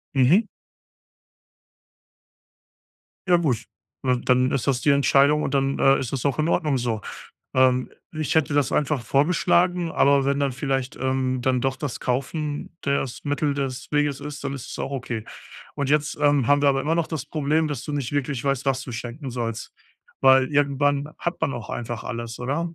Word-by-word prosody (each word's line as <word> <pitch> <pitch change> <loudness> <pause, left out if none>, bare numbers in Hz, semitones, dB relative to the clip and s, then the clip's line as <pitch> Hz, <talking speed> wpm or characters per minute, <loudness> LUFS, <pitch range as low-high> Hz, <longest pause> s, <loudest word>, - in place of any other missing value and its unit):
Mhm. 165 - +4 2.8
Ja 175 -1 +5
gut, 125 -9 0 0.4
ne, 125 -2 +1
dann 125 +1 +3
ist 135 -1 -1
das 130 -2 +1
die 150 - +2
Entscheidung 140 +1 +4
und 140 - -2
dann, 135 0 0
äh, 135 0 +5
ist 130 - -4
das 135 -2 -3
auch 140 - -1
in 155 - +1
Ordnung 150 -5 +1
so. 115 -3 -2 0.5
Ähm, 130 -1 +3 0.2
ich 155 -2 -2
hätte 155 -2 +2
das 145 -2 +2
einfach 145 -4 0
vorgeschlagen, 175 +5 +2
aber 140 -1 +4
wenn 140 0 +1
dann 140 -2 +1
vielleicht, 135 -1 -2
ähm, 130 -1 -1
dann 130 -1 +1
doch 135 +1 -1
das 145 -5 -5
Kaufen 145 +5 -3
das 140 -3 -2
Mittel 145 0 0
des 135 -2 -4
Weges 145 -2 +1
ist, 145 -1 -7
dann 140 0 -3
ist 135 - -8
es - - -7
auch - - -3
okay. 125 -5 -4 0.5
Und 140 -1 -2
jetzt, 150 0 +1
ähm, 145 -4 +3
haben 145 0 +3
wir 145 - +5
aber 135 0 0
immer 155 +4 0
noch 170 -1 0
das 155 -6 -5
Problem, 155 +1 0
dass 140 -5 -4
du 150 - -5
nicht 140 -4 -2
wirklich 140 -3 -1
weißt, 135 -1 -1
was 135 -1 0
du 125 - -8
schenken 125 +4 -6
sollst, 115 -2 -4 0.5
weil 130 0 +5
irgendwann 145 0 +1
hat 175 0 -3
man 140 - +1
auch 120 -4 -7
einfach 120 -1 -5
alles, 115 -2 -5
oder? 165 +7 -2
140 Hz, 185 wpm, -24 LUFS, 130-145 Hz, 2.8 s, Ja